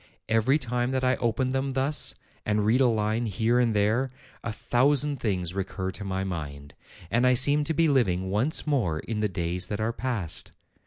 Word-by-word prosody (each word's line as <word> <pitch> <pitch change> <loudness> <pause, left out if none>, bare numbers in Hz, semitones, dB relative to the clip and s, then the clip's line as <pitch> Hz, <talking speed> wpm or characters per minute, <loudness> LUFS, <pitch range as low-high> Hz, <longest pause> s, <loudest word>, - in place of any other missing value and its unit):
Every 115 +5 +3
time 125 -3 -1
that 130 0 0
I 130 0 +3
open 120 +2 0
them 135 +1 -1
thus, 135 +3 0 0.3
and 105 0 0
read 120 +5 +3
a 130 - +5
line 110 +1 0
here 110 +4 +1
and 115 -3 +2
there, 110 +6 +2 0.3
a 115 - -2
thousand 140 +5 +2
things 90 -5 -1
recur 95 -1 -3
to 100 - -8
my 95 -1 -2
mind, 75 -6 -6 0.4
and 120 +2 +3
I 125 - +5
seem 145 +4 +3
to 160 - 0
be 165 +1 +3
living 95 - +1
once 120 +10 0
more 120 - +1
in 110 -2 -4
the 105 -1 +1
days 90 0 -2
that 105 - -3
are 110 +2 -1
past. 110 -8 -3
115 Hz, 195 wpm, -27 LUFS, 95-130 Hz, 0.4 s, a